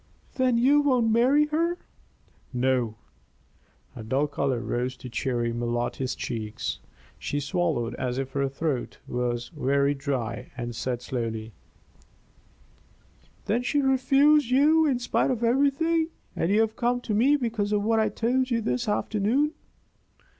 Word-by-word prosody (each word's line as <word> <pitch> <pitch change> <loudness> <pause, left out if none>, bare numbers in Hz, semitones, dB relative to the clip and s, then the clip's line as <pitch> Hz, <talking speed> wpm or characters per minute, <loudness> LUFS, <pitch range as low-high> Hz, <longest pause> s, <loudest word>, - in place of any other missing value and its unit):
"Then 255 -2 +2
you 275 +5 +5
won't 250 -6 +2
marry 260 +6 +4
her?" 335 +3 0 0.7
"No." 125 -3 0 1.0
A - - -7
dull 130 +7 0
color 140 -3 -1
rose 125 +2 -3
to 125 - -9
Cherry 120 -1 -1
Malotte's 120 +2 -2
cheeks; 110 -2 -4 0.4
she 145 - -2
swallowed 145 -6 -1
as 125 -1 -2
if 135 0 -3
her 140 0 0
throat 135 -2 -3
were 120 -1 -1 0.2
very 140 0 +2
dry, 130 -5 -3
and 120 -1 -4
said, 125 0 -3
slowly: 115 -3 -4 1.9
"Then 235 +4 +1
she 285 +4 0
refused 275 +1 +4
you 305 +5 +4
in 265 -4 +2
spite 245 - 0
of 240 -3 -1
everything, 285 +7 +2 0.3
and 165 - 0
you 210 +2 +4
have 220 0 0
come 245 0 0
to 225 - -3
me 255 +8 +4
because 225 -6 -1
of 205 -1 +1
what 225 +1 +2
I 215 -1 +2
told 250 +5 0
you 235 -2 +1
this 235 +1 -1
afternoon. 220 +8 +1
205 Hz, 140 wpm, -26 LUFS, -, 1.9 s, you